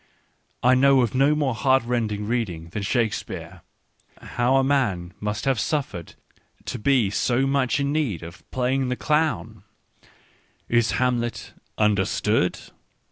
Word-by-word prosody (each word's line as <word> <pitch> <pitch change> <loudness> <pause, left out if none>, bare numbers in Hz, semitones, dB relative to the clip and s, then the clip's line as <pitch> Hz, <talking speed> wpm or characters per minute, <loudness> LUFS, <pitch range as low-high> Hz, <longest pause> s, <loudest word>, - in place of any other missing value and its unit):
I 125 +1 +5
know 135 +1 +5
of 115 - -2
no 140 +3 +3
more 145 -4 0
heartrending 120 -4 0
read 115 -1 0
ing 85 -1 -9
than 100 +4 -4
Shakespeare: 110 +2 -2 0.6
how 120 +2 0
a 135 - +4
man 105 -11 0
must 105 +3 -3
have 135 -4 +1
suffered 115 - -3 0.5
to - - -4
be 120 -4 +2
so 125 +5 +1
much 135 -1 +1
in 140 0 0
need 135 - -1
of 85 0 -10
playing 130 +1 0
the 125 - 0
clown 150 - -1 0.4
I - - -25 0.6
Is 120 -1 +2
Hamlet 120 -4 -1 0.2
understood"! 105 -1 +1
125 Hz, 135 wpm, -24 LUFS, 105-135 Hz, 0.6 s, I